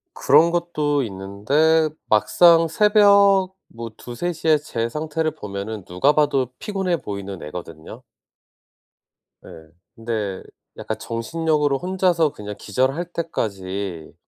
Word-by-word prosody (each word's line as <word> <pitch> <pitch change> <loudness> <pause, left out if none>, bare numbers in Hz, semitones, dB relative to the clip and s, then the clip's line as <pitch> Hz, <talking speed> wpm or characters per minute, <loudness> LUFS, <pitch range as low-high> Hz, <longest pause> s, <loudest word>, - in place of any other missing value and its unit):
그런 155 +5 +4
것도 150 -5 0
있는데 120 +11 +1 0.2
막상 165 - +5
새벽 200 0 +4
뭐 115 0 -8
2:00-3:00 165 +7 -5
에 155 - +6
제 115 -6 -4
상태를 155 +3 -2
보면은 105 - -7
누가 90 +12 +2
봐도 140 -4 +1
피곤해 190 -5 -2
보이는 100 - -7
애거든요. 80 0 -9 1.4
네 - - -14 0.5
근데 110 -5 -4 0.3
약간 - - -5
정신력으로 150 +4 -1
혼자서 180 -4 +1
그냥 105 0 -8
기절할 130 - -1
때까지 95 - -4
145 Hz, 230 characters per minute, -21 LUFS, 105-165 Hz, 1.4 s, 에